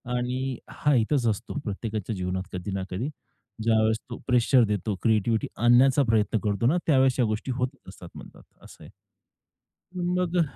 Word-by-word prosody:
आणि 125 +1 -2
हा 150 -1 0
येतंच 120 +2 +1
असतो 110 +1 -2
प्रत्येकाच्या 105 0 -4
जीवनात 95 0 -3
कधी 90 +2 -4
ना 95 -1 -2
कधी. 115 +11 -3 0.5
ज्यावेळेस 110 -1 +3
तो 120 - -6
प्रेशर 125 0 +4
देतो, 105 -1 -2
क्रिएटिव्हिटी 110 -1 +1
आणण्याचा 130 +4 +5
प्रयत्न 110 -1 +2
करतो 105 +2 0
ना, 170 +6 +3
त्यावेळेस 130 -3 +3
या 120 - +4
गोष्टी 110 +4 -2
होतच 125 +1 -3
असतात 90 -2 -12
म्हणतात. - - -12 0.2
असं - - -14
आहे. - - -12 1.1
मग 180 0 -1
अ, - - +5
115 Hz, 160 wpm, -26 LUFS, 105-130 Hz, 1.1 s, आणण्याचा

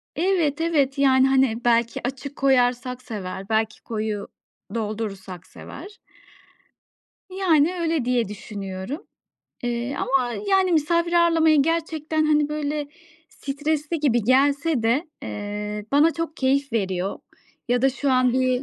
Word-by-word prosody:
Evet, 330 -4 +1
evet. 290 -5 +1
Yani, 265 -1 +4
hani, 260 -3 +2
belki 235 -1 +2
açık 270 +2 -6
koyarsak 250 -1 +1
sever, 195 -5 -6
belki 220 0 0
koyu 215 -2 -3 0.5
doldurursak 205 -5 -5
sever. 390 +7 -11 1.3
Yani, 360 -3 +2
öyle 325 -6 0
diye 245 -3 +1
düşünüyorum. 200 - -7 0.6
Eee, 240 +2 -2
ama, 255 -3 0 0.2
yani, 380 -2 +3
misafir 335 +2 +1
ağırlamaya 330 -2 +4
gerçekten, 315 0 0
hani, 300 -1 +3
böyle, 300 -1 -2 0.4
stresli 300 +3 -3
gibi 240 -6 +2
gelse 280 +3 +2
de, 260 +9 +1
eee, 210 0 -5
bana 300 +4 +5
çok 330 -1 -4
keyif 275 0 +1
veriyor 190 -3 -1 0.5
ya 245 0 +1
da 270 - +4
şu 275 +1 -1
an 255 -1 +3
bir 255 0 +1
270 Hz, 120 wpm, -23 LUFS, 230-310 Hz, 1.3 s, bana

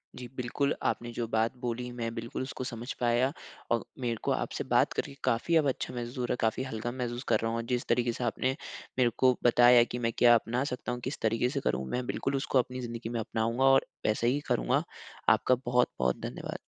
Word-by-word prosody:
जी 125 - -7
बिल्कुल। 125 +3 0
आपने 120 0 -1
जो 120 0 -2
बात 110 0 +1
बोली 125 0 -3
मैं 115 -2 -4
बिल्कुल 115 0 -4
उसको 130 0 -5
समझ 120 0 -5
पाया। 120 +2 +2 0.4
और 115 - +2 0.2
मेरे 120 -2 -1
को - - +1
आपसे - - -2
बात - - +4
करके 140 - -3
काफ़ी 130 +7 +1
अच्छा 140 -5 +1
महसूस 120 0 -5
हो 125 - 0
रहा - - 0
है, - - -2
काफ़ी 110 +3 +1
हल्का 120 -2 -4
महसूस 120 -1 -4
कर - - +3
रहा 115 0 -1
हूँ 115 - -1
और 115 - -2
जिस 120 - 0
तरीके 120 0 +2
से 125 - -4
आपने 130 +3 0 0.4
मेरे 120 -2 +5
को 130 -1 +4
बताया 120 0 +7
कि 120 +1 -5
मैं 115 -1 0
क्या 120 -1 +7
अपना 120 +3 0
सकता 125 - -4
हूँ, 125 - -3
किस 130 - -4
तरीके 115 +3 +1
से 140 - -2
करूँ, 65 - -1
मैं 125 - -2
बिल्कुल 135 0 -1
उसको 135 -1 +2
अपनी 125 +1 -2
ज़िंदगी 115 -1 -5
में 120 - -2
अपनाऊँगा 115 +3 -1
और 135 0 +5 0.2
वैसे 110 +2 +2
ही 135 +4 +2
करूँगा। - - +2 0.5
आपका 130 - +4
बहुत-बहुत 120 - +1
धन्यवाद। - - -5
120 Hz, 220 wpm, -30 LUFS, 115-125 Hz, 0.5 s, बताया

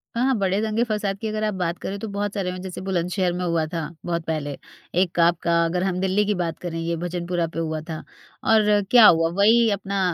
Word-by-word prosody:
हाँ, 235 - +1
हाँ 265 -1 +2
बड़े 195 -1 +1
दंगे-फ़साद 215 -2 -1
की 220 - -2
अगर 215 0 -2
आप 215 -1 0
बात 175 -2 -2
करें 200 - -4
तो 225 - -5
बहुत 205 0 -3
सारे 195 -3 -2
हुए 180 0 -5
जैसे 185 -1 -7
बुलंदशहर 180 -1 -1
में 180 +1 -3
हुआ 170 -2 +1
था, 165 +1 -4 0.2
बहुत 170 -1 -2
पहले। 145 -3 -3 0.4
एक 175 -2 -1
आपका 170 0 +3
अगर 180 +2 -1
हम 185 -1 -1
दिल्ली 190 +2 +1
की 210 - +1
बात 170 -3 -2
करें 170 -2 -5
ये 165 +1 -2
भजनपुरा 175 0 -2
पे 165 - -6
हुआ 160 -1 -2
था। 160 - -3 0.5
और 210 -2 +4
क्या 240 -3 +8
हुआ? 165 -3 +6
वही 220 +6 +4
अपना 200 0 -2
180 Hz, 225 wpm, -23 LUFS, 170-205 Hz, 0.5 s, क्या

